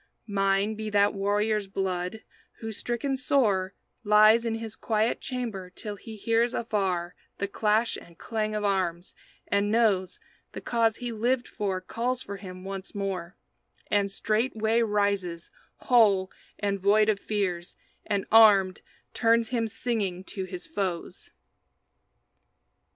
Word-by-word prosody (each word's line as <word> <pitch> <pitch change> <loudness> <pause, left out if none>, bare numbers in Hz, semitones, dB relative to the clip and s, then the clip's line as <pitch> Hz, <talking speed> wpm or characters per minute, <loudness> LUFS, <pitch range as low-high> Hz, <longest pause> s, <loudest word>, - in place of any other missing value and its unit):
Mine 195 0 +1
be 215 0 -5
that 205 0 +3
warrior's 205 +1 0
blood 190 +1 -3 0.3
who, 225 -1 -7
stricken 240 +5 -2
sore, 205 -8 +1 0.3
Lies 215 +2 +6
in 225 -1 0
his 225 -1 -6
quiet 220 +1 0
chamber 230 -8 -4
till 205 +3 -7
he 220 +3 -10
hears 230 +3 +1
Afar 190 -6 -1 0.2
the 200 - -2
clash 215 +3 +1
and 170 -1 -14
clang 215 -2 -2
of 210 - -2
arms, 185 -3 -1 0.3
and 200 0 +1
knows 210 -5 +2 0.3
The - - -5
cause 230 -2 +1
he 245 0 -5
lived 240 +3 0
for 195 -4 -2
calls 245 +7 -3
for 200 0 -6
him 185 -2 -9
once 195 0 -7
more; 195 -3 -3 0.6
And 200 -1 +2
straightway 220 +2 0
rises, 200 -6 0 0.2
whole 205 -6 +3 0.3
and 200 -1 -1
void 210 +3 +4
of 215 -2 +2
fears, 185 -5 -2 0.3
And 200 -2 -1
armed, 200 -4 +6 0.3
turns 230 -1 +3
him 230 -2 0
singing 210 -5 -2
to 190 -3 -3
his 180 -1 -7
foes. 190 - -4
210 Hz, 135 wpm, -27 LUFS, 195-225 Hz, 0.6 s, Lies